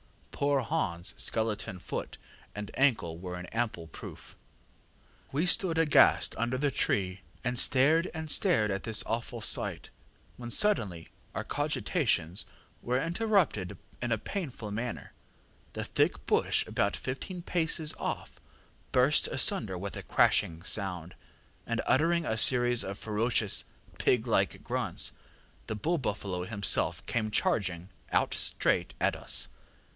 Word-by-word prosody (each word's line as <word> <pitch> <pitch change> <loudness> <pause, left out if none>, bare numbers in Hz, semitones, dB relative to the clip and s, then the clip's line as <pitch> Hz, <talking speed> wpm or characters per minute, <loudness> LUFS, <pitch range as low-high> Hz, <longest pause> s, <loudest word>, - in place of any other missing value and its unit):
Poor 140 -2 +1
HansŌĆÖ 85 -5 -2
skeleton 110 -4 -1
foot 90 - -5 0.4
and 105 0 -6
ankle 110 -12 +1
were 90 0 -6
an 90 0 -6
ample 115 -8 -2
proof. 80 - -11 1.0
ŌĆ£We 155 +6 0
stood 180 -3 +2
aghast 165 -2 +5
under 120 +2 0
the 140 +1 +1
tree, 95 -6 0 0.2
and 125 0 +1
stared 155 +7 +4
and 160 -2 -3
stared 115 - +4
at 95 0 -2
this 110 -2 0
awful 115 +1 -3
sight, - - 0 0.5
when 120 -1 -7
suddenly 105 - +1 0.3
our - - -2
cogitations 85 +4 -1 0.4
were 125 +2 0
interrupted 170 - 0 0.2
in 120 -1 -2
a 110 - +3
painful 125 - -5
manner. 115 +3 -5 0.6
The - - -3
thick - - 0
bush - - +2
about - - 0
fifteen 170 +8 -5
paces 160 -3 0
off - - -5 0.5
burst 130 +4 +3
asunder 110 -6 +2
with 100 +2 -5
a - - -5
crashing 80 +1 +2
sound, 90 -4 -2 0.5
and 115 -1 -1
uttering 165 +4 +2
a 110 -4 -1
series 120 -1 +5
of 100 +1 -5
ferocious 110 -1 +1 0.3
pig 125 -2 +2
like 95 -7 +1
grunts, - - -2 0.6
the 110 - -3
bull 165 +10 0
buffalo 100 -7 -3
himself 100 0 +1
came 110 -2 -1
charging 90 -4 0 0.2
out - - +2
straight - - +1
at - - +2
us. - - +1
115 Hz, 130 wpm, -30 LUFS, 100-140 Hz, 1.0 s, aghast